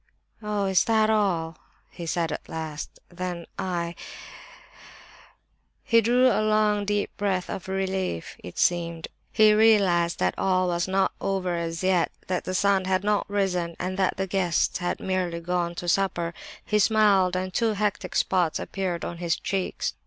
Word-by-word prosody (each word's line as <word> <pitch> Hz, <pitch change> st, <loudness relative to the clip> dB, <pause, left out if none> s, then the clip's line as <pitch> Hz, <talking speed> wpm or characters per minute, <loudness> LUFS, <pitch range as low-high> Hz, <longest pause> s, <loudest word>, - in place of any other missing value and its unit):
"Oh, 210 Hz, -2 st, -1 dB
is 190 Hz, -2 st, +3 dB
that 220 Hz, -1 st, +3 dB
all?" 170 Hz, -7 st, 0 dB, 0.3 s
he 170 Hz, -, -8 dB
said 165 Hz, 0 st, -1 dB
at -, -, -6 dB
last. 155 Hz, -2 st, -6 dB
"Then 175 Hz, -1 st, -5 dB
I—" 170 Hz, -2 st, -2 dB, 1.9 s
He 230 Hz, -1 st, +4 dB
drew 245 Hz, +3 st, +3 dB
a 250 Hz, -4 st, +4 dB
long, 215 Hz, -1 st, +2 dB
deep 205 Hz, 0 st, -1 dB
breath 195 Hz, -3 st, -1 dB
of 190 Hz, -, -6 dB
relief, 190 Hz, -, -2 dB
as -, -, -8 dB
it -, -, -18 dB
seemed. 170 Hz, -2 st, 0 dB, 0.2 s
He 215 Hz, -1 st, +5 dB
realized 195 Hz, -6 st, +4 dB
that 90 Hz, -1 st, +1 dB
all 185 Hz, -1 st, +2 dB
was 175 Hz, 0 st, 0 dB
not 190 Hz, 0 st, +1 dB
over 185 Hz, -2 st, -1 dB
as 165 Hz, 0 st, -3 dB
yet, 185 Hz, -2 st, +2 dB
that 185 Hz, -1 st, -2 dB
the 185 Hz, -, -3 dB
sun 195 Hz, 0 st, +2 dB
had 185 Hz, 0 st, +1 dB
not 210 Hz, 0 st, 0 dB
risen, 180 Hz, -4 st, -1 dB
and 185 Hz, +1 st, -3 dB
that 190 Hz, -1 st, +1 dB
the 195 Hz, -, -1 dB
guests 185 Hz, -2 st, 0 dB
had 175 Hz, -1 st, -2 dB
merely 185 Hz, -3 st, -2 dB
gone 175 Hz, 0 st, -2 dB
to 175 Hz, -, -6 dB
supper. 175 Hz, -2 st, 0 dB, 0.3 s
He 210 Hz, -, +1 dB
smiled, 200 Hz, -4 st, +4 dB
and 185 Hz, 0 st, -3 dB
two 225 Hz, -2 st, +1 dB
hectic 210 Hz, 0 st, -2 dB
spots 180 Hz, -4 st, +1 dB
appeared 185 Hz, -3 st, -3 dB
on 170 Hz, -, -6 dB
his 170 Hz, -2 st, 0 dB
cheeks. 190 Hz, 0 st, -2 dB
185 Hz, 165 wpm, -25 LUFS, 175-200 Hz, 1.9 s, He